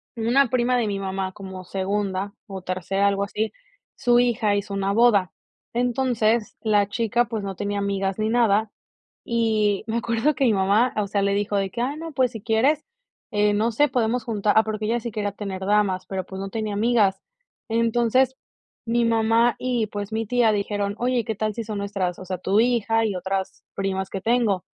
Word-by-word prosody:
una 240 +3 +2
prima 250 0 +2
de 235 -3 +1
mi 200 - -2
mamá, 190 -1 -3
como 190 -2 -8
segunda 195 +1 -2
o 190 -3 -7
tercera, 185 +2 -1
algo 200 0 +1
así, 210 +1 -2 0.4
su 240 0 +3
hija 225 -4 +2
hizo 200 0 -3
una 195 0 0
boda, 205 -5 +4 0.5
entonces, 240 -3 +1
la 205 -2 +2
chica, 230 +2 +1
pues, 225 -3 -4
no 195 -1 -4
tenía 205 0 -2
amigas 195 -1 -1
ni 215 0 0
nada, 220 -2 +2 0.5
y 220 -3 +1
me 225 - -1
acuerdo 235 +5 +1
que 270 - +1
mi 225 - +4
mamá, 200 +6 +2
o 210 -1 0
sea, 200 0 0
le 200 - +2
dijo 205 0 0
de 195 -1 0
que: 235 - -4
"Ah, 275 +4 -1
no, 325 +1 -6
pues, 255 -3 +2
si 225 - -8
quieres, 245 +8 +2 0.5
eh, 210 0 +2
no 220 +3 +1
sé, 295 +6 +3
podemos 240 0 0
juntar", 210 -3 +1
ah, 220 - +7
porque 215 -1 -3
ella 235 +2 +1
sí 235 - -5
quería 205 -1 -2
tener 190 -2 -5
damas, 200 -3 +1
pero, 190 -2 -4
pues, 190 0 -8
no 195 - -4
tenía 215 0 -3
amigas. 205 -3 +2 0.5
Entonces, 235 +3 +2 0.5
mi 235 +1 +1
mamá 230 0 +3
y, 245 -4 0
pues, 205 0 -6
mi 225 +1 -1
tía 240 -1 +3
dijeron: 205 0 -1
"Oye, 245 -2 0
¿qué 220 -1 -2
tal 215 +1 -1
si 230 - -3
son 210 -2 -4
nuestras 195 -3 -2
o 185 - -9
sea, 185 0 -3
tu 195 +3 +2
hija 225 -2 +2
y 205 -4 -1
otras 190 +1 -3
primas 190 -1 -2
que 195 - -5
tengo?". 225 -5 +1
215 Hz, 200 wpm, -24 LUFS, 200-235 Hz, 0.5 s, ah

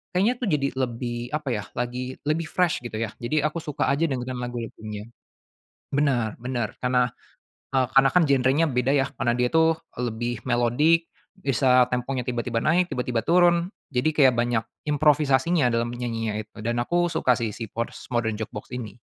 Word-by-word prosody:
kayaknya 210 +7 +3
tuh 235 - -1
jadi 140 -3 +1
lebih 120 -1 -3
apa 150 -3 -3
ya 105 -2 -2
lagi 125 +1 -3
lebih 155 +2 0
fresh 180 -2 +1
gitu 115 -2 -6
ya. 115 -1 -2
Jadi 150 +5 0
aku 155 +2 -1
suka 150 -4 -2
aja 160 +4 +2
dengerin 125 -1 -3
lagu-lagunya. 110 -3 -6 0.9
Benar 130 -7 +1
benar 120 -3 -3
karena, 125 -1 +2 0.7
eee, 130 -1 +4
karena 135 0 +6
kan 180 -2 +5
genrenya 135 +4 +3
beda 125 +2 +1
ya, 135 -1 +2
karena 120 -3 +2
dia 125 0 +2
itu, 160 0 +4 0.2
eee, 125 - -2
lebih 120 +2 -3
melodic, 135 +8 +3 0.3
bisa 130 -2 +4
temponya 125 +1 -1
tiba-tiba 120 -1 -1
naik 175 +7 +2
tiba-tiba 125 -2 -1
turun 175 +1 +4 0.2
jadi 140 +4 +1
kayak 135 -5 +5
banyak 120 -1 +1 0.2
improvisasinya 145 -1 +3
dalam 115 0 +1
menyanyinya 115 -3 -3
itu 110 - -24
dan 120 +2 -1
aku 175 +4 +1
suka 130 -6 +2
sih 115 -2 -1
si 115 - -5
Postmodern 115 -1 -2
Jukebox 105 -1 -6
ini. 115 -2 -7
125 Hz, 165 wpm, -25 LUFS, 120-150 Hz, 0.9 s, karena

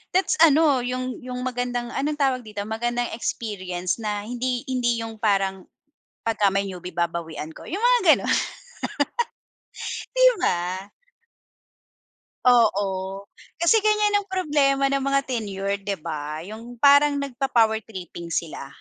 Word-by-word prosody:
that's 380 - +2
ano, 305 -3 +6
yung 255 0 -3
yung 250 0 -6
magandang, 245 -1 -2
anong 295 +2 -1
tawag 265 -2 +2
dito, 210 -1 -5
magandang 240 +3 -2
experience 185 -6 -3
na 210 -2 -2
hindi 245 +1 -2
hindi 240 -2 +1
yung 225 -1 -7
parang 195 -3 +1 0.6
pagka 215 -3 +3
may 195 +1 0
newie 180 -1 -7
babawian 165 -2 -3
ko. - - -12
Yung 395 +6 -4
mga - - +4 0.2
gano'n. - - 0 1.8
Di - - +6 0.2
ba? 180 +2 0 1.6
Oo, 225 -5 +4 0.7
kasi 340 +7 +4
ganiyan 425 -1 +3
ang 405 - -5
problema 290 -7 +2
ng 275 - +2
mga 275 0 +2
tenure, 200 -6 -2
di 200 0 -3
ba? 155 -2 -5
Yung 225 +5 -9
parang 285 +3 +6
nagpa-power 245 -5 +1
tripping 175 -5 -7
sila. 155 -4 -3
240 Hz, 130 wpm, -24 LUFS, 195-275 Hz, 1.8 s, ano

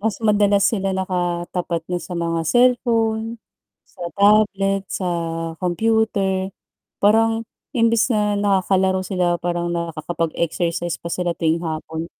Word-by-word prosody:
Mas 210 -1 -1
madalas 205 -2 +3
sila 195 -3 +1
nakatapat 175 -2 -2
na 180 - 0
sa 180 - -7
mga 165 -1 -1
cellphone, 230 -2 +2 0.5
sa - - -22 0.2
tablet, 200 -1 +3
sa 185 - -3 0.5
kompyuter. 195 0 0 0.5
Parang 225 +2 +3 0.3
imbis 230 0 +3
na 210 -1 +1
nakakalaro 190 -1 +2
sila 180 -2 0
parang 175 0 -1
nakakapag-exercise 170 0 -2
pa 170 - -6
sila 175 -1 -1
tuwing 165 0 +1
hapon. 160 0 -4
190 Hz, 115 wpm, -21 LUFS, 175-210 Hz, 0.5 s, madalas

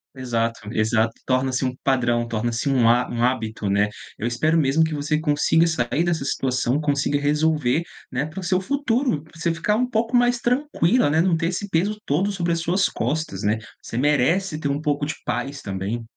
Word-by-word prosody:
Exato, 115 -3 -2
exato. 110 +1 +1
Torna-se 130 0 0
um 130 -1 -1
padrão, 120 -3 +1
torna-se 115 +3 -2
um 125 -4 +4
ha 125 +1 +3
um 120 0 -2
hábito, 110 -5 -1
né? 100 +1 +3 0.3
Eu 110 - -4
espero 155 +8 +1
mesmo, 150 +1 +3
que 160 -1 -1
você 150 +1 -1
consiga 155 +2 +2
sair 160 +1 0
dessa 165 -5 -1
situação. 130 +1 0
Consiga 145 0 +1
resolver, 150 0 +1 0.3
né, 130 +2 -1
para 155 +5 -7
o 185 - -6
seu 185 +1 +1
futuro, 255 - 0
pra 160 - -20
você 165 0 0
ficar 175 +5 0
um 250 +3 +2
pouco 230 +1 0
mais 245 0 +3
tranquila, 250 - +2
né. 160 +2 +3
Não 175 -2 +2
ter 165 - -1
esse 185 +4 -3
peso 195 +5 0
todo 185 +9 +1
sobre 175 -3 -1
as 165 - -1
suas 180 +4 +1
costas, 125 -6 -3
né? 105 +2 +2 0.2
Você 115 - -6
merece 155 +6 +2
ter 140 - -2
um 140 +2 -1
pouco 145 -1 0
de 150 - -3
paz 140 0 -3
também. 100 +4 -4
145 Hz, 195 wpm, -23 LUFS, 125-170 Hz, 0.3 s, um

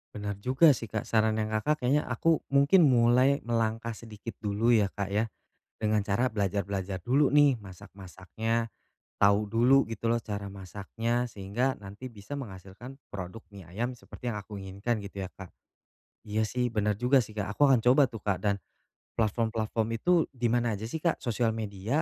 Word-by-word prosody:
Benar 105 -1 -4
juga 130 +8 +5
sih, 115 -4 -3
Kak. 110 +1 -3
Sarannya 110 -1 +1
Kakak 140 +7 0
kayaknya 140 +4 +2
aku 160 +7 +2
mungkin 140 +4 +5
mulai 125 +3 +4
melangkah 115 0 -1
sedikit 110 0 -9
dulu 105 +3 +1
ya, 105 -4 +4
Kak, 100 -1 -4
ya, 105 +3 +1 0.5
dengan 105 -1 +1
cara 115 +6 +1
belajar-belajar 100 -2 -2
dulu 135 +3 +2
nih 145 -3 +5
masak-masaknya, 100 +3 -5 0.5
tahu 100 +1 +5
dulu 125 +4 +5
gitu 115 +1 -3
loh 115 0 +1
cara 100 -1 -5
masaknya, 105 +5 -3
sehingga 115 +5 -2
nanti 100 +6 -8
bisa 105 +1 -10
menghasilkan 100 +2 -9 0.2
produk 100 +3 -7
mie 95 -4 -12
ayam 115 +8 -3
seperti 125 0 -7
yang 105 - -4
aku 105 +1 -10
inginkan 100 +3 -3
gitu 100 0 -8
ya, - - -17
Kak? 95 -2 -10 0.7
Iya 110 0 -1
sih 125 -2 -1
bener 105 -1 0
juga 125 +5 +4
sih, 110 -3 -7
Kak. 105 0 -2
Aku 145 +6 +4
akan 125 -4 +4
coba 130 +2 +5
tuh, 115 -5 -10
Kak, 100 -3 0
dan 100 -2 +1 0.6
platform-platform 110 0 0
itu 180 - +3 0.2
di 120 -3 0
mana 120 -1 +1
aja 110 +3 -5
sih, 160 - -3
Kak? 170 0 0
Sosial 115 -2 0
media 110 +6 -2
110 Hz, 170 wpm, -29 LUFS, 100-125 Hz, 0.7 s, juga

